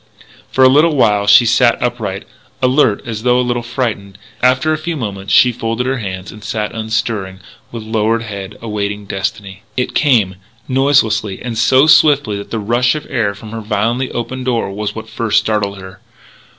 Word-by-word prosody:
For 130 Hz, -, +3 dB
a -, -, +8 dB
little 150 Hz, +4 st, +4 dB
while 105 Hz, -6 st, +2 dB
she 110 Hz, +4 st, +7 dB
sat 120 Hz, +1 st, +3 dB
upright, 110 Hz, -6 st, -3 dB, 0.3 s
alert, 130 Hz, -5 st, +2 dB
as 110 Hz, -2 st, -5 dB
though 125 Hz, +1 st, +2 dB
a 125 Hz, -, +1 dB
little 120 Hz, 0 st, -1 dB
frightened. 115 Hz, -5 st, -4 dB, 0.2 s
After 130 Hz, +5 st, +2 dB
a -, -, -1 dB
few 170 Hz, +1 st, -3 dB
moments 100 Hz, -5 st, -5 dB
she 125 Hz, -, +6 dB
folded 115 Hz, +1 st, -3 dB
her 130 Hz, 0 st, -1 dB
hands 95 Hz, -3 st, -6 dB
and 105 Hz, -1 st, -13 dB
sat 105 Hz, -1 st, -3 dB
unstirring, 110 Hz, -4 st, -3 dB, 0.3 s
with 115 Hz, -2 st, -7 dB
lowered 110 Hz, +1 st, 0 dB
head, 100 Hz, -2 st, -7 dB
awaiting 105 Hz, -2 st, -3 dB
Destiny. 95 Hz, 0 st, -5 dB, 0.2 s
It 125 Hz, -, -1 dB
came, 110 Hz, -11 st, +2 dB, 0.3 s
noiselessly. 115 Hz, -7 st, +1 dB
And 120 Hz, -2 st, -4 dB
so 130 Hz, +5 st, +4 dB
swiftly 145 Hz, -8 st, +4 dB
that 100 Hz, -, -8 dB
the 115 Hz, -, -3 dB
rush 120 Hz, +5 st, +1 dB
of 150 Hz, -, -5 dB
air 105 Hz, -4 st, 0 dB
from 105 Hz, +1 st, -11 dB
her 115 Hz, 0 st, -5 dB
violently 115 Hz, +4 st, -1 dB
opened 130 Hz, +2 st, -5 dB
door 120 Hz, -5 st, -1 dB
was 105 Hz, +1 st, -4 dB
what 110 Hz, 0 st, -7 dB
first 115 Hz, 0 st, -1 dB
startled 105 Hz, -2 st, 0 dB
her. 95 Hz, 0 st, -11 dB
115 Hz, 180 wpm, -16 LUFS, 105-125 Hz, 0.3 s, a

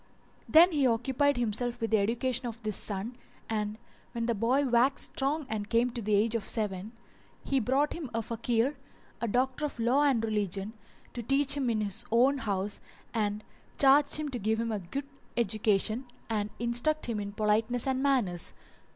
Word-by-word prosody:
Then 340 Hz, +4 st, +7 dB
he 285 Hz, -5 st, +2 dB
occupied 260 Hz, +4 st, +1 dB
himself 240 Hz, +1 st, -1 dB
with 225 Hz, -1 st, -2 dB
the 220 Hz, -, +4 dB
education 240 Hz, +4 st, -1 dB
of 230 Hz, -1 st, -7 dB
this 215 Hz, -2 st, 0 dB
son 210 Hz, +4 st, -3 dB, 0.3 s
and, 210 Hz, -1 st, -2 dB, 0.4 s
when 235 Hz, -1 st, -2 dB
the 235 Hz, -, +1 dB
boy 240 Hz, +6 st, +1 dB
waxed 250 Hz, +3 st, +2 dB
strong 285 Hz, +3 st, -1 dB
and 210 Hz, -2 st, -4 dB
came 235 Hz, +2 st, +2 dB
to 235 Hz, 0 st, -5 dB
the 210 Hz, 0 st, +1 dB
age 215 Hz, +3 st, +2 dB
of 230 Hz, -3 st, -2 dB
seven, 210 Hz, 0 st, -2 dB, 0.5 s
he 275 Hz, -, +1 dB
brought 265 Hz, +5 st, +1 dB
him 320 Hz, -6 st, -6 dB
a 230 Hz, 0 st, -2 dB
Fakih, 235 Hz, +3 st, 0 dB, 0.5 s
a 235 Hz, -, 0 dB
doctor 255 Hz, +5 st, 0 dB
of 295 Hz, -, -3 dB
law 245 Hz, +5 st, +3 dB
and 265 Hz, -6 st, +2 dB
religion, 205 Hz, -1 st, -2 dB, 0.4 s
to 240 Hz, -, -4 dB
teach 275 Hz, +4 st, +2 dB
him 270 Hz, -4 st, 0 dB
in 220 Hz, -2 st, 0 dB
his 210 Hz, +2 st, -2 dB
own 260 Hz, +4 st, +4 dB
house 200 Hz, -3 st, -2 dB, 0.3 s
and 210 Hz, -2 st, -1 dB, 0.3 s
charged 280 Hz, +1 st, +5 dB
him 305 Hz, -1 st, +1 dB
to 250 Hz, -3 st, -4 dB
give 220 Hz, +2 st, 0 dB
him 230 Hz, 0 st, -1 dB
a 215 Hz, -, -2 dB
good 235 Hz, +11 st, -5 dB, 0.3 s
education 220 Hz, +1 st, +1 dB, 0.3 s
and 210 Hz, -1 st, -1 dB
instruct 240 Hz, +7 st, +1 dB
him 230 Hz, -3 st, -2 dB
in 200 Hz, 0 st, -4 dB
politeness 220 Hz, +3 st, +1 dB
and 265 Hz, -1 st, 0 dB
good -, -, -2 dB
manners. 235 Hz, -12 st, 0 dB
235 Hz, 185 wpm, -29 LUFS, 215-265 Hz, 0.5 s, Then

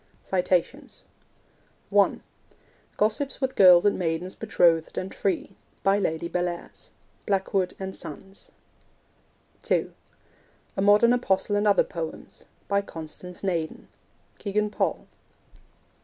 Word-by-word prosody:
(1) -, -, +3 dB, 0.7 s
Gossips 220 Hz, +7 st, 0 dB
with 265 Hz, -1 st, -1 dB
Girls 180 Hz, -2 st, +7 dB
and 205 Hz, -, +2 dB
Maidens 175 Hz, +1 st, -2 dB
Betrothed 170 Hz, -7 st, +2 dB
and 185 Hz, -, -3 dB
Free. 195 Hz, 0 st, -1 dB, 0.3 s
By 195 Hz, +1 st, +3 dB
Lady 160 Hz, -3 st, -1 dB
Bellairs. 175 Hz, 0 st, -4 dB, 0.4 s
(Blackwood 195 Hz, -2 st, 0 dB
and 190 Hz, 0 st, -5 dB
Sons.) 195 Hz, +6 st, -10 dB, 1.1 s
(2) -, -, 0 dB, 0.8 s
A 195 Hz, -, -1 dB
Modern 210 Hz, +4 st, +6 dB
Apostle 205 Hz, -4 st, +1 dB
and 205 Hz, +1 st, +2 dB
Other 200 Hz, -, +5 dB
Poems. 165 Hz, -2 st, -7 dB, 0.2 s
By 200 Hz, 0 st, +2 dB
Constance 175 Hz, 0 st, -9 dB
Naden. 170 Hz, -5 st, -3 dB, 0.5 s
(Kegan 210 Hz, +1 st, -1 dB
Paul.) -, -, -1 dB
190 Hz, 100 wpm, -26 LUFS, 175-205 Hz, 1.1 s, Girls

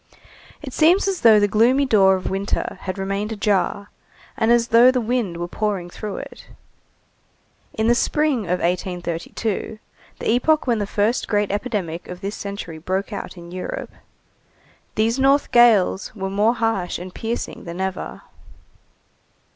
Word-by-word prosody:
It 265 Hz, -3 st, -7 dB
seems 350 Hz, +6 st, +4 dB
as 385 Hz, -3 st, -1 dB
though 220 Hz, -3 st, +7 dB
the 205 Hz, -, +3 dB
gloomy 240 Hz, +7 st, +3 dB
door 195 Hz, -6 st, +5 dB
of 185 Hz, -, -4 dB
winter 195 Hz, +1 st, -2 dB
had 185 Hz, +1 st, -4 dB
remained 195 Hz, +2 st, -2 dB
ajar, 205 Hz, -1 st, -1 dB, 0.4 s
and 225 Hz, +1 st, +2 dB
as 235 Hz, 0 st, +3 dB
though 235 Hz, +2 st, +7 dB
the 255 Hz, 0 st, +2 dB
wind 230 Hz, -7 st, -1 dB
were 175 Hz, 0 st, -3 dB
pouring 195 Hz, -3 st, -3 dB
through 210 Hz, 0 st, -6 dB
it. -, -, -10 dB, 1.3 s
In 220 Hz, 0 st, 0 dB
the 240 Hz, -, +5 dB
spring 280 Hz, -2 st, +1 dB
of 180 Hz, +1 st, -1 dB
1832, 180 Hz, +4 st, -3 dB, 0.4 s
the -, -, -1 dB
epoch 300 Hz, +6 st, +2 dB
when 235 Hz, -4 st, +1 dB
the 205 Hz, -, -2 dB
first 210 Hz, +4 st, 0 dB
great 205 Hz, -1 st, 0 dB
epidemic 200 Hz, -6 st, -3 dB
of 180 Hz, 0 st, -8 dB
this 200 Hz, +1 st, -4 dB
century 200 Hz, -5 st, -6 dB
broke 190 Hz, +6 st, -3 dB
out 200 Hz, -, -6 dB
in 170 Hz, 0 st, -11 dB
Europe, 185 Hz, 0 st, -5 dB, 1.0 s
these 225 Hz, +4 st, +1 dB
north 275 Hz, +2 st, +3 dB
gales 225 Hz, -5 st, +4 dB
were 195 Hz, -2 st, -4 dB
more 210 Hz, +4 st, +2 dB
harsh 225 Hz, -6 st, -1 dB
and 180 Hz, +1 st, -9 dB
piercing 230 Hz, +1 st, -5 dB
than 170 Hz, +1 st, -7 dB
ever. 190 Hz, -1 st, -4 dB
205 Hz, 155 wpm, -21 LUFS, 190-235 Hz, 1.3 s, though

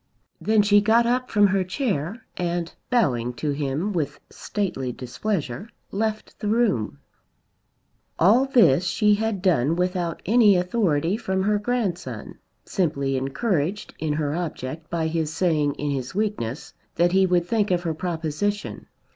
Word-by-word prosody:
Then 215 Hz, -1 st, +3 dB
she 205 Hz, 0 st, +5 dB
got 225 Hz, +3 st, +4 dB
up 250 Hz, +1 st, 0 dB
from 205 Hz, -2 st, +4 dB
her 195 Hz, -1 st, +2 dB
chair 190 Hz, -, -2 dB
and 175 Hz, -1 st, -2 dB, 0.2 s
bowing 125 Hz, -, +1 dB
to 145 Hz, +4 st, -2 dB
him 145 Hz, +7 st, -2 dB
with 150 Hz, -5 st, -2 dB
stately 175 Hz, -11 st, -3 dB
displeasure 140 Hz, -, -4 dB, 0.2 s
left 215 Hz, +1 st, -3 dB
the 210 Hz, -, -3 dB
room. 205 Hz, -, +1 dB, 1.2 s
All 220 Hz, +10 st, +5 dB
this 200 Hz, -, +4 dB
she 210 Hz, +3 st, +3 dB
had 210 Hz, -2 st, -1 dB
done 160 Hz, -5 st, +3 dB
without 180 Hz, -2 st, -1 dB
any 215 Hz, -1 st, +5 dB
authority 180 Hz, -2 st, +1 dB
from 190 Hz, -4 st, -1 dB
her 210 Hz, +1 st, +2 dB
grandson, 210 Hz, -6 st, -3 dB, 0.3 s
simply 140 Hz, -7 st, 0 dB
encouraged 165 Hz, -, -1 dB
in 155 Hz, -2 st, -1 dB
her 150 Hz, -1 st, -1 dB
object 155 Hz, -2 st, -5 dB
by 165 Hz, -1 st, -1 dB
his 160 Hz, -1 st, -1 dB
saying 155 Hz, -4 st, +1 dB
in 145 Hz, 0 st, -2 dB
his 130 Hz, 0 st, -4 dB
weakness 200 Hz, -, -2 dB, 0.2 s
that 175 Hz, +1 st, +3 dB
he 190 Hz, 0 st, +4 dB
would 175 Hz, -1 st, +2 dB
think 215 Hz, -1 st, +1 dB
of 175 Hz, -1 st, +1 dB
her 165 Hz, -2 st, -1 dB
proposition. 175 Hz, +4 st, -3 dB
180 Hz, 145 wpm, -24 LUFS, 150-210 Hz, 1.2 s, she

